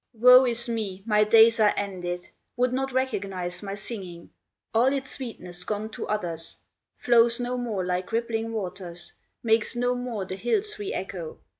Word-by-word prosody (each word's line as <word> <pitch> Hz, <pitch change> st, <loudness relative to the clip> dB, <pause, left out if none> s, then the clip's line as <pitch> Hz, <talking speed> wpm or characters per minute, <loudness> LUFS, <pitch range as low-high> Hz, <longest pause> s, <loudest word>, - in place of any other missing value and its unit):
"Woe 250 Hz, +3 st, +8 dB
is 235 Hz, 0 st, -2 dB
me, 210 Hz, -5 st, -3 dB
my 210 Hz, -2 st, +4 dB
days 225 Hz, +1 st, +6 dB
are 210 Hz, -1 st, +4 dB
ended, 180 Hz, -3 st, -4 dB, 0.3 s
Would 250 Hz, 0 st, +2 dB
not 270 Hz, +1 st, -1 dB
recognize 195 Hz, -9 st, -2 dB
my 200 Hz, -1 st, -5 dB
singing, 190 Hz, -5 st, -7 dB, 0.4 s
All 240 Hz, +4 st, +4 dB
its 270 Hz, -1 st, -3 dB
sweetness 180 Hz, -9 st, -4 dB
gone 210 Hz, +2 st, -3 dB
to -, -, -6 dB
others, 170 Hz, -6 st, -3 dB, 0.4 s
Flows 235 Hz, 0 st, +4 dB
no 245 Hz, +1 st, -2 dB
more 225 Hz, -7 st, -2 dB
like 180 Hz, +2 st, -2 dB
rippling 225 Hz, 0 st, -1 dB
waters, 180 Hz, -5 st, -6 dB, 0.3 s
Makes 225 Hz, 0 st, +2 dB
no 245 Hz, +1 st, +1 dB
more 245 Hz, -5 st, -4 dB
the 185 Hz, 0 st, -6 dB
hills 410 Hz, -, -1 dB
re 410 Hz, 0 st, -3 dB
echo! 475 Hz, 0 st, -5 dB
225 Hz, 160 wpm, -26 LUFS, 190-245 Hz, 0.4 s, Woe